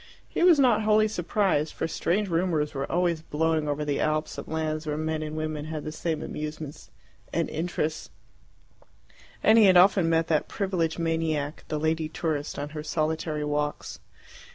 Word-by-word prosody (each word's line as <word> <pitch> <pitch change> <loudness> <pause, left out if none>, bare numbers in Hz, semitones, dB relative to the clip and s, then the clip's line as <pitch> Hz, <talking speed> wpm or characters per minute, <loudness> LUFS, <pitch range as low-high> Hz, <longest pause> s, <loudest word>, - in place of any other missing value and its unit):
He - - -3
was 350 -3 +7
not 245 -6 +4
wholly 215 0 +4
surprised, 180 -5 0
for - - -2
strange 195 +5 0
rumours 165 -4 0
were 135 -1 -3
always 175 -2 +1
blowing 160 0 0
over 145 +1 -1
the 145 -1 -1
Alps 155 0 -1
of - - -8
lands 155 0 -2
where 150 0 -1
men 155 0 -2
and 155 0 -5
women 155 -1 -3
had 155 -1 -5
the 155 - -5
same 160 0 -3
amusements 150 -1 -6 0.4
and 165 0 0
interests, 160 -1 -2 1.3
and 220 +1 +6
he 215 - +7
had 185 -2 +6
often 185 -2 +5
met 165 0 +2
that 155 -2 +1
privileged 180 -5 -1
maniac, 160 -3 -1
the 155 - -2
lady 160 0 0
tourist, 155 -3 -3
on 145 +1 -4
her 150 0 -6
solitary 155 0 -1
walks. 150 0 -2
160 Hz, 170 wpm, -27 LUFS, 150-175 Hz, 1.3 s, was